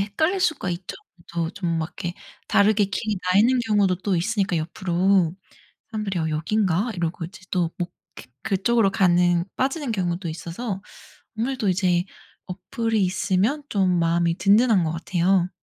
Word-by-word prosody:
헷갈릴 315 - 0
수가 315 - 0
있죠. 175 +1 -5 0.4
더 170 -1 -1
좀 175 -4 -2
막 160 +1 -2
이렇게 175 -1 -3 0.3
다르게 210 0 +4
길이 210 +1 -2
나 180 +1 0
있는 245 +5 +5
경우도 200 -4 +3
또 190 +1 -1
있으니까 195 0 0
옆으로. 175 +1 +1 0.6
사람들이 210 -4 -3
'여 160 - -1
여기인가?' 195 +6 0
이러고 170 -1 -3
이제 190 +5 -10
또 175 -3 0
목 175 0 -3 0.2
이렇게 125 - -12
그쪽으로 200 +2 +2
가는 175 -2 +3
빠지는 270 0 -1
경우도 175 -3 -2
있어서 185 +5 -5 0.6
아무래도 240 -3 -1
이제 180 -1 +2 0.4
어플이 220 +4 -2
있으면 200 +10 0
좀 185 -3 +2
마음이 170 0 +1
든든한 205 -2 +4
것 160 - -1
같아요. 180 +2 +1
190 Hz, 340 characters per minute, -23 LUFS, 175-210 Hz, 0.6 s, 있는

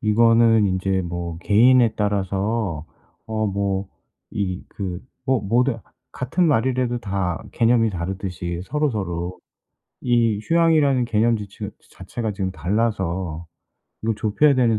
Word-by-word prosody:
이거는 115 -1 +4
인제 95 0 0
뭐 85 -1 -5
개인에 115 +5 +4
따라서 100 -3 -1 0.4
어 110 -1 -1
뭐 100 -1 -1 0.4
이 95 -3 -3
그 95 -4 -5 0.3
뭐 130 -3 +2
뭐든 120 +4 +1 0.3
같은 150 +8 0
말이래도 125 -2 +1
다 95 -5 -2
개념이 115 -1 +3
다르듯이 90 -2 -4
서로서로 95 - -2 0.6
이 115 -4 +2
휴양이라는 155 -4 +3
개념 115 0 +2
지체가 100 -2 -7 0.2
자체가 110 -3 -4
지금 95 -1 -2
달라서 95 -4 -2 0.6
이걸 110 0 0
좁혀야 125 +8 +3
되는 115 -4 +3
105 Hz, 255 characters per minute, -22 LUFS, 95-120 Hz, 0.6 s, 이거는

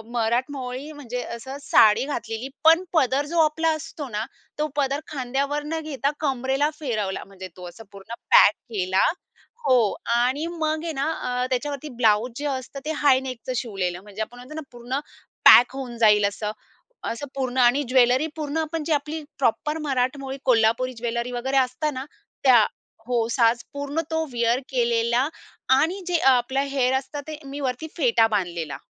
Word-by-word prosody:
मराठमोळी 255 +4 -2
म्हणजे 250 -5 -5
असं 265 +4 -8
साडी 225 -3 +5
घातलेली, 235 -3 -4
पण 325 +3 +6
पदर 275 -2 +2
जो 335 +3 -1
आपला 320 +2 +1
असतो 310 -1 -7
ना, 215 0 -3 0.3
तो 305 - +1
पदर 280 -1 0
खांद्यावर 280 +2 -2
न 320 +2 -2
घेता 280 -2 -1
कमरेला 270 0 0
फिरवला. 215 -9 -2
म्हणजे 190 -1 -10
तो 180 -1 -8
असा 225 +6 -13
पूर्ण 200 +3 -10 0.2
पॅक 205 - +8 0.2
केला. 190 -1 +2 0.6
हो 255 -1 +5 0.4
आणि 255 +6 +1
मग 310 0 -1
आहे 330 -1 -3
ना 280 +3 -1
अ, 250 -3 -2
त्याच्यावरती 285 +3 -3
ब्लाउज 220 +2 +3
जे 290 - -4
असतं 270 0 -4
ते 310 - -1
हाय 260 -2 +6
नेकचं 255 0 -5
शिवलेलं. 190 -7 -3
म्हणजे 205 +1 -8
आपण 235 +3 -5
म्हणतो 250 +5 -10
ना 315 - -4
पूर्ण 245 +3 -4 0.5
पॅक 245 +2 +8
होऊन 255 -3 -6
जाईल 210 -2 +5
असं, 210 +1 -4 0.6
असं 260 +5 -5
पूर्ण. 260 -2 -2
आणि 250 +3 +5
ज्वेलरी 255 +3 +4
पूर्ण 305 -1 -3
आपण 320 0 -2
जी 325 - -3
आपली 300 +2 -2 0.2
प्रॉपर 300 +4 +1
मराठमोळी 265 +1 -1
कोल्हापुरी 240 +1 +3
ज्वेलरी 235 +1 -3
वगैरे 260 +3 -1
असतं 260 +3 +1
ना 260 +1 -5 0.4
त्या. 245 -5 +7 0.4
हो, 235 -2 +1
साज 235 -1 +3
पूर्ण 285 +2 -2
तो 320 0 +1
विअर 235 0 +1
केलेला 235 0 +1 0.5
आणि 335 +7 0
जे 355 -1 +2 0.2
आपलं 255 +2 +1
हेअर 260 -2 +2
असतं 285 +2 -7
ते 310 -1 -6
मी 275 +1 -7
वरती 260 +3 -2
फेटा 235 -6 +4
बांधलेला. 175 -8 -2
255 Hz, 165 wpm, -24 LUFS, 235-290 Hz, 0.6 s, पॅक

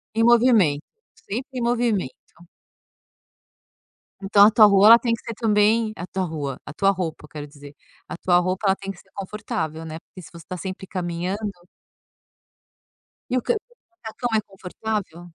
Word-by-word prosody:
Em 225 - +2
movimento, 230 - +4 0.3
sempre 255 +4 -6
em - - -4
movimento. 235 - 0 2.1
Então 200 +1 +6
a 215 - +6
tua 215 -1 +7
rua, 200 0 +6
ela 230 +1 +9
tem 235 -2 0
que 230 - -4
ser 230 - -5
também 220 0 +2
a 180 - -6
tua 190 -1 -3
rua, 145 -6 -4
a - - -8
tua 195 +3 +3
roupa, 165 -5 -5
quero 150 -1 -8
dizer. 145 -1 -14 0.3
A - - -6
tua 175 -1 +3
roupa, 185 +3 -1
ela 190 - +4
tem 195 0 -6
que 195 - -13
ser - - -22
confortável, 190 -5 -5
né, 160 0 -6
porque 185 - -14
se - - -13
você 170 -2 -12
está 185 - -6
sempre 190 +1 -6
caminhando 185 +4 -3 1.8
E - - +1
o - - -8
co - - +2
o - - 0 0.3
macacão 245 -6 -6
é - - +1
confortável? 195 -2 -5
195 Hz, 170 wpm, -23 LUFS, 175-220 Hz, 2.1 s, ela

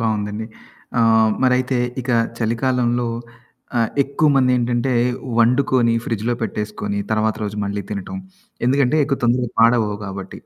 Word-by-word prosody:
బావుందండి. 110 -1 -2 0.5
ఆహ్, 110 -1 +4
మరైతే 125 0 +2 0.2
ఇక 125 0 -4 0.3
చలికాలంలో 120 +1 0 0.7
ఆహ్, 115 - +1
ఎక్కువమంది 140 -2 +2
ఏంటంటే, 120 +1 0 0.5
వండుకొని 120 0 +3
ఫ్రిడ్జ్‌లో 115 +1 -1
పెట్టేసుకొని, 105 -2 -3
తరవాత 110 0 +1
రోజు 105 0 -4
మళ్ళీ 100 0 -3
తినటం, 100 - -5 0.5
ఎందుకంటే, 135 +2 +2
ఎక్కువ 135 -1 -1
తొందరగా 120 0 +1
పాడవ్వవు 115 -3 +3
కాబట్టి 95 -1 -7
115 Hz, 115 wpm, -20 LUFS, 110-125 Hz, 0.7 s, ఆహ్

